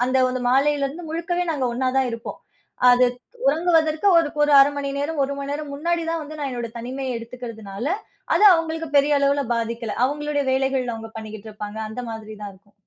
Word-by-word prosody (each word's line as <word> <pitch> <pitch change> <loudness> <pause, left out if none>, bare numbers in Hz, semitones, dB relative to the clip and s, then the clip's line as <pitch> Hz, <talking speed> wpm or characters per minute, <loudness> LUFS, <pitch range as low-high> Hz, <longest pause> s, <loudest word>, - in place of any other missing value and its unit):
அந்த 260 +1 +2
வந்து 255 0 -3
மாலையில 280 +2 +3
இருந்து 320 +4 -8
முழுக்கவே 340 +2 -1
நாங்க 275 -4 -2
ஒண்ணா 255 +1 0
தான் 260 - +2
இருப்போம். 230 0 -6 0.5
அது 250 0 +5 0.4
உறங்குவதற்கு 320 +2 +2
ஒரு 325 -3 +2 0.2
ஒரு 295 - +2
1/2 275 - +7
மணி 280 -1 -2
நேரம், 290 +1 -2
1 280 - -3
மண்நேரம் 285 +1 -4
முன்னாடி 335 +3 -1
தான் 330 -1 -2
வந்து 305 +1 -9
நான் 280 - -2
என்னுடைய 240 -2 -5
தனிமைய 255 +1 -4
எடுத்துக்கிறதுனால, 230 -2 -7 0.5
அது 415 +5 +6
அவுங்களுக்கு 325 -1 -2
பெரிய 285 0 +3
அளவுல 280 0 +2
பாதிக்கல. 230 -1 -3
அவுங்களுடைய 295 +1 -1
வேலைகள் 265 -2 0
அவுங்க 225 0 -8
பண்ணிக்கிட்டுருப்பாங்க. 215 -1 -8
அந்த 235 - -5
மாதிரி 215 -1 -7
தான் 205 - -6
இருக்கும். 200 +2 -25
275 Hz, 175 wpm, -23 LUFS, 230-300 Hz, 0.5 s, 1/2